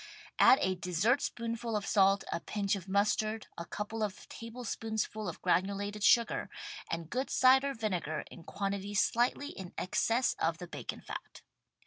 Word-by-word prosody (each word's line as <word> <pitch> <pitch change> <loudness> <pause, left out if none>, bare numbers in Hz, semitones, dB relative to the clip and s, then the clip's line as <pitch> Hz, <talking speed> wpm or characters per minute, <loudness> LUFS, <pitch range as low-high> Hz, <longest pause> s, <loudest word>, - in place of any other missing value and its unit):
Add 260 - +8
a 185 - +2
dessert 185 - +1
spoonful 230 -1 -3
of 205 -1 -1
salt, 195 -1 +4
a - - -1
pinch 200 +2 -1
of 190 -1 -7
mustard, 215 +2 +1
a 170 - -6
couple 215 +5 -4
of 210 -3 -3
tablespoonsful 225 -3 -4
of 170 - -9
granulated 200 +3 0
sugar 235 +1 +4 0.4
and 165 -1 -3
good 260 +2 -1
cider 265 +2 +5
vinegar 180 -9 -2
in 170 - -11
quantity 200 +2 -3
slightly 240 +7 +2
in 185 -2 -9
excess 230 +6 +1
of 165 0 +1
the 180 0 -8
bacon - - -6
fat. - - -8
205 Hz, 150 wpm, -32 LUFS, 190-230 Hz, 0.4 s, Add